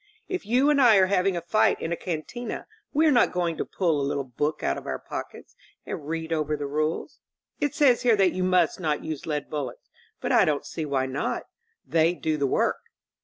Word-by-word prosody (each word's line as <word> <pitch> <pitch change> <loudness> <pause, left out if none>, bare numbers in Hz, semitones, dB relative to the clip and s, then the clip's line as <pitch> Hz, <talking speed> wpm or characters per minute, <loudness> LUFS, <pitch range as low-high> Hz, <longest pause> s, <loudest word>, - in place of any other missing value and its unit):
If 370 - -4
you 255 +6 +4
and 285 -2 +3
I 235 -4 +7
are 190 -1 +6
having 185 -1 +1
a - - -2
fight 175 +6 +2
in 165 - -4
a - - +1
cantma 180 +9 -5 0.3
we 310 +3 +3
are 310 - +5
not 245 - +4
going 175 -2 -1
to - - -2
pull 165 -6 0
a 140 - 0
little 140 - -1
book 145 +4 -3
out 70 - +1
of - - -8
our - - -2
pockets - - -8 0.3
and 145 - -6
read 165 0 -3
over 155 -1 -1
the 145 - -4
rules. 155 +3 -2 0.4
It 290 0 -1
says 275 -6 +4
here 240 -3 +4
that 195 -3 +3
you 185 - -1
must 180 -3 +2
not 155 -4 -1
use 155 -3 -5
lead 150 -2 -2
bullets; 140 -5 -6 0.3
but - - -2
I - - +6
don't 145 -2 0
see 160 -2 -5
why 135 -2 0
not. 135 +2 -2 0.4
They 165 +1 +2
do 160 -2 -1
the 140 -2 +1
work." - - +1
165 Hz, 220 wpm, -26 LUFS, 150-200 Hz, 0.4 s, I